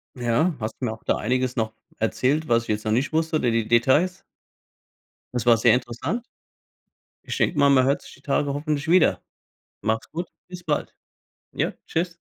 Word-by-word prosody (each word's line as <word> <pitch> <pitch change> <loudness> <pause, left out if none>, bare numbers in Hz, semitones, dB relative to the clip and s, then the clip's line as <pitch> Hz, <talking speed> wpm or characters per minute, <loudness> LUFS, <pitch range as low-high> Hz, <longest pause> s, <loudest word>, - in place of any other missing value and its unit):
Ja. 125 +8 +1
Hast 110 0 -4
du 130 - -2
mir 110 - -1
auch 110 - -14
da - - +1
einiges 125 +2 0
noch 110 -3 -1 0.2
erzählt, 135 +7 0
was 115 0 +3
ich - - -14
jetzt 105 +1 -1
noch 110 - 0
nicht 130 +7 0
wusste, 160 0 +1
De 120 - +2
De 115 -1 +1
Details. 130 +11 +3 1.1
Das 120 -1 -2
war 115 - +7
sehr 110 - +5
interessant. 130 - -2 0.9
Ich - - -5
denke 150 - +1
mal, 140 - +6
man 135 -2 +5
hört 140 +1 +1
sich - - -13
die - - -18
Tage 140 0 0
hoffentlich 150 +1 -2
wieder. 175 0 +4 0.6
Mach‘s 110 +1 -1
gut. 175 +2 -4 0.2
Bis 180 -1 -9
bald. 155 -4 -2 0.6
Ja, - - -1
tschüss. 175 +1 -2
130 Hz, 185 wpm, -24 LUFS, 115-160 Hz, 1.1 s, war